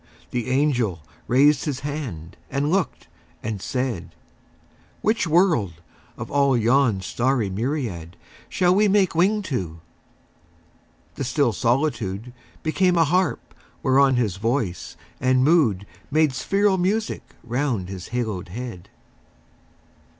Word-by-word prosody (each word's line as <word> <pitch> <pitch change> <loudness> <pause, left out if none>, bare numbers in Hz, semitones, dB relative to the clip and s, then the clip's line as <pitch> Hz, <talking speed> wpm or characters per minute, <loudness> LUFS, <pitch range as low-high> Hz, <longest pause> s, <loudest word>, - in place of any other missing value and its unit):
The 120 -1 -2
angel 125 - +1 0.3
raised 135 +2 +4
his 140 -4 -3
hand 135 - -5
and 140 +3 -1
looked 195 0 -1 0.4
and 110 -3 -4
said, 120 -11 -3 0.9
"Which 215 -3 +1
world, 160 - +3 0.4
of - - -7
all 140 -2 +3
yon 120 -3 +3
starry 120 +1 0
myriad 105 - -3 0.3
Shall 180 -1 +3
we 210 +2 +4
make 195 -2 +3
wing 200 +5 +2
to?" 90 - -4 1.3
The - - -4
still 130 -1 +1
solitude 120 -4 -1 0.3
Became 180 +3 +2
a 165 - +5
harp 180 +2 0 0.3
whereon 135 0 +4
his 110 -7 0
voice 115 -4 -2 0.2
and 130 0 +3
mood 130 - +3 0.2
Made 155 -1 +3
spheral 195 +6 +1
music 210 +5 0 0.2
round 120 -5 -1
his 95 -2 -7
haloed 110 -7 -3
head. 115 -3 -7
130 Hz, 115 wpm, -23 LUFS, 110-155 Hz, 1.3 s, a